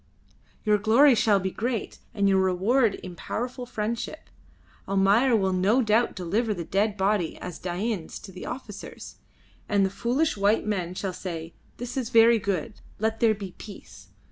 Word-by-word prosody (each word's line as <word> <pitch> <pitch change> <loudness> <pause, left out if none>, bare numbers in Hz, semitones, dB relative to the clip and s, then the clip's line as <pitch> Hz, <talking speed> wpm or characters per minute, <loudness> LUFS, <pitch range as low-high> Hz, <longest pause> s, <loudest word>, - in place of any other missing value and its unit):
Your 210 -1 +3
glory 240 +7 +6
shall 215 -3 +3
be 190 0 -2
great, 230 0 -3 0.2
and 200 -1 +2
your 195 -1 +4
reward 195 +5 +2
in 180 -1 -9
powerful 245 +6 -4
friendship. 235 +7 -4 0.6
Almayer 200 +6 +3
will 190 -3 +1
no 205 +8 +3
doubt 225 +2 +2
deliver 210 +5 -1
the 175 - -4
dead 200 +4 0
body 195 -3 0
as 180 -2 -7
Dain's 185 0 -3
to 195 - -10
the 185 - -8
officers, 230 -5 -8 0.5
and 200 -2 +3
the 190 - -2
foolish 245 +10 0
white 205 +2 +2
men 185 -4 -2
shall 190 0 -3
say, 165 -3 -6 0.2
'This 245 +2 -6
is 245 -3 -2
very 230 -1 +6
good; 200 +2 -3 0.2
let 220 +1 -1
there 225 -2 +4
be 195 -3 -8
peace.' 105 - -12
210 Hz, 165 wpm, -26 LUFS, 190-230 Hz, 0.6 s, glory